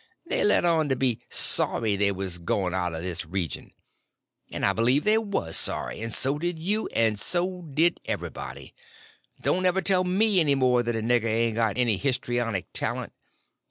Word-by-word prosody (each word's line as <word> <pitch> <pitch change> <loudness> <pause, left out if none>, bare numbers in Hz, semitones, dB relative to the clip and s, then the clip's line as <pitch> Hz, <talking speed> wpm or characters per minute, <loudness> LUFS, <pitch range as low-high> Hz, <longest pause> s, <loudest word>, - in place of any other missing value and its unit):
They - - 0
let 205 -3 +3
on 160 -3 +2
to 130 - +1
be 125 -3 -1
sorry 110 -3 +3
they 100 0 +2
was 95 -2 -3
going 90 +1 -2
out 90 -3 -2
of 80 - -6
this 90 -3 -3
region! 85 0 -5 0.8
And - - -2
I 100 - +3
believed 125 +7 +1
they 215 +1 +4
was 200 - -3
sorry, - - -1
and 115 0 -4
so 135 +6 0
did 175 +1 -2
you, 205 +7 -1
and 110 -2 0
so 180 - -2
did 165 +5 +2
everybody. - - -6 0.7
Don't 185 0 +2
ever 190 +1 +1
tell 185 -2 +4
me 195 +2 +3
any 145 -4 +3
more 125 -2 +2
that 120 -1 -2
a 110 - -2
nigger 120 0 +1
ain't 115 +1 0
got 110 -1 -1
any 120 -5 +2
histrionic 120 -6 -2
talent. - - -2
120 Hz, 180 wpm, -25 LUFS, 105-175 Hz, 0.8 s, they